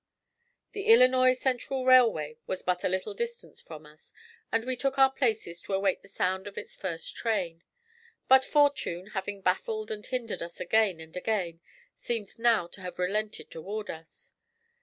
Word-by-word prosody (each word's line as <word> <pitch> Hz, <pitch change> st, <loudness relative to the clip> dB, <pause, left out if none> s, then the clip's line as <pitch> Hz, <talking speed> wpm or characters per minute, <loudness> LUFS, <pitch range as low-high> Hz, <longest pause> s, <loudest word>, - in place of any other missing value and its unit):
The 405 Hz, -1 st, -5 dB
Illinois 255 Hz, -, +6 dB
Central 260 Hz, 0 st, -2 dB
Railway 225 Hz, -, +5 dB
was 185 Hz, -, -3 dB
but 180 Hz, -1 st, 0 dB
a -, -, +2 dB
little 190 Hz, +3 st, -2 dB
distance 470 Hz, -, -6 dB
from 155 Hz, -2 st, -11 dB
us, 150 Hz, +1 st, -18 dB, 0.4 s
and 225 Hz, 0 st, +1 dB
we 255 Hz, 0 st, -1 dB
took 270 Hz, +2 st, -1 dB
our 270 Hz, 0 st, +6 dB
places 220 Hz, -10 st, -1 dB
to -, -, -6 dB
await 195 Hz, -1 st, +1 dB
the -, -, -17 dB
sound 190 Hz, 0 st, -1 dB
of 200 Hz, -, -10 dB
its -, -, -6 dB
first 170 Hz, -4 st, -5 dB
train. 185 Hz, -8 st, -2 dB, 0.7 s
But 265 Hz, 0 st, +7 dB
fortune, 265 Hz, -, +1 dB
having 195 Hz, 0 st, -4 dB
baffled 215 Hz, +4 st, -1 dB
and 210 Hz, -1 st, -5 dB
hindered 245 Hz, -2 st, -3 dB
us 170 Hz, 0 st, -7 dB
again 215 Hz, -6 st, +2 dB
and 160 Hz, +1 st, -11 dB
again, 180 Hz, -4 st, -2 dB, 0.3 s
seemed 230 Hz, -3 st, -5 dB
now 230 Hz, -6 st, +3 dB
to 195 Hz, -, -11 dB
have 180 Hz, -1 st, -7 dB
relented 210 Hz, +4 st, -2 dB
toward 205 Hz, +6 st, -5 dB
us. 160 Hz, 0 st, -13 dB
210 Hz, 165 wpm, -29 LUFS, 180-255 Hz, 0.7 s, But